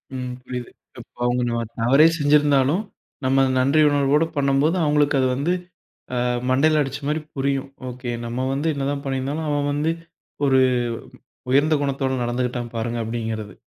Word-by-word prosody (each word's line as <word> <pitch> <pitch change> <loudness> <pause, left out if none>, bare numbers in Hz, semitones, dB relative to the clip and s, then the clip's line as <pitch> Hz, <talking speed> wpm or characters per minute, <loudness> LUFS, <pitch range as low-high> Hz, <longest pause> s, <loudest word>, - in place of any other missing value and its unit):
ம். 125 -1 -4
புரியிது. 125 -1 -6 0.3
இப்போ - - -15
அவங்க 120 0 +1
நம்ம 115 0 -1 0.2
தவறே 135 +7 +5
செஞ்சிருந்தாலும் 145 +3 +3 0.4
நம்ம 135 +1 +3 0.2
நன்றி 140 +4 +3
உணர்வோட 145 +2 +3
பண்ணும்போது, 140 +4 +2
அவங்களுக்கு 145 -1 +2
அது 130 - +3
வந்து 155 +7 0 0.6
அ - - -1 0.3
மண்டையில 150 +4 +3
அடிச்ச 135 0 -5
மாரி 155 +1 0 0.2
புரியும். 135 0 -1 0.2
"ஓகே. 125 0 -6
நம்ம 120 +2 -2
வந்து 145 +4 -1
என்னதான் 140 0 -2
பண்ணியிருந்தாலும் 135 +4 -2
அவன் 145 0 0
வந்து 150 +3 0 0.6
1 130 -1 +4 0.9
உயர்ந்த 145 +4 +4
குணத்தோட 135 -1 -1
நடந்துக்கிட்டான் 120 0 -2
பாருங்க" 115 +1 -2
அப்டிங்கிறது. 110 -2 -4
135 Hz, 140 wpm, -22 LUFS, 125-145 Hz, 0.9 s, தவறே